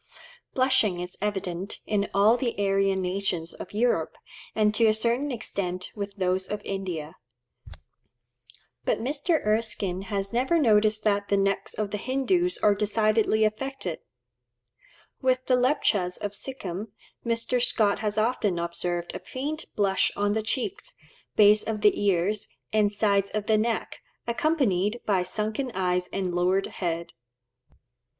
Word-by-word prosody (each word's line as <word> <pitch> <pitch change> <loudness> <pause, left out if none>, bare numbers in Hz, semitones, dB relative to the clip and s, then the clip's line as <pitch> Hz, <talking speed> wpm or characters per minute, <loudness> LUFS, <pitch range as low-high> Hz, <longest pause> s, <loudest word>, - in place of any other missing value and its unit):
Blushing 255 -8 +3
is 180 +1 -5
evident 195 -2 -3
in 205 -1 0
all 205 +4 +5
the 245 -2 -2
Aryan 195 -1 +1
nations 180 -3 -2
of - - -9
Europe, 210 -7 0 0.4
and 210 -1 +3
to 225 +1 +4
a 215 - +4
certain 240 +6 0
extent 185 -6 -3
with 200 -1 -5
those 185 -1 0
of 210 - -3
India. 180 -4 -4 1.7
But - - +1
Mr. 295 +5 0
Erskine 210 -4 0
has 195 0 -2
never 260 +8 +2
noticed 215 -6 +3
that 205 -1 +1
the 200 - +2
necks 195 0 0
of 210 -2 -2
the 210 - -2
Hindoos 345 - +1
are 210 - +6
decidedly 215 +1 +2
affected. 215 -5 -2 1.2
With 255 -1 +1
the 255 - +3
Lepchas 235 -8 +1
of 205 - -4
Sikhim, 205 -5 -5 0.4
Mr. 235 +1 0
Scott 215 -4 +2
has 210 -1 -2
often 215 -4 +1
observed 170 0 -3
a - - -4
faint 295 +4 -4
blush 195 -2 +2
on 205 0 +1
the 220 - 0
cheeks, 270 - -3 0.4
base 210 0 +6
of 215 -2 -3
the 210 0 +3
ears, 200 +2 +1 0.3
and 210 -1 +3
sides 200 -1 +2
of 215 -1 -3
the 215 0 +3
neck, 230 +1 -2 0.2
accompanied 235 - +1
by 195 -3 +2
sunken 215 +7 -2
eyes 180 -1 0
and 185 -2 -2
lowered 180 +2 +2
head. 170 -2 -4
210 Hz, 140 wpm, -26 LUFS, 190-230 Hz, 1.7 s, are